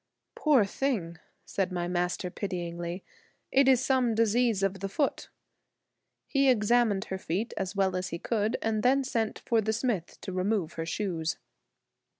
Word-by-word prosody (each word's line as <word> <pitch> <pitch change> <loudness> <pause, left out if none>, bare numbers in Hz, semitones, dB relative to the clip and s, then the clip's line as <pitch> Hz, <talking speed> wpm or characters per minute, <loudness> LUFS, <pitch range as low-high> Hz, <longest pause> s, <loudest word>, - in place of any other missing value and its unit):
"Poor 280 -9 +4
thing!" 195 -8 -2 0.3
said 195 -1 -1
my 175 -1 -2
Master 180 +1 -1
pityingly, 175 -2 -4 0.5
"it 270 0 +4
is 260 -1 +5
some 255 -4 +2
disease 230 -2 +2
of 195 0 0
the 195 +1 -3
foot." 280 +8 -1 1.0
He 275 -1 +3
examined 220 -3 +3
her 190 - -3
feet 190 +7 -2
as 190 +1 -3
well 190 -1 +1
as 185 0 -2
he 170 - -4
could 215 +3 0
and 220 -1 0
then 270 +4 +3
sent 230 -4 -1
for 230 -2 +1
the 220 +1 0
smith 215 -7 -2
to 195 - -5
remove 185 -2 0
her 165 0 -4
shoes. 165 -4 -2
205 Hz, 155 wpm, -29 LUFS, 180-235 Hz, 1.0 s, is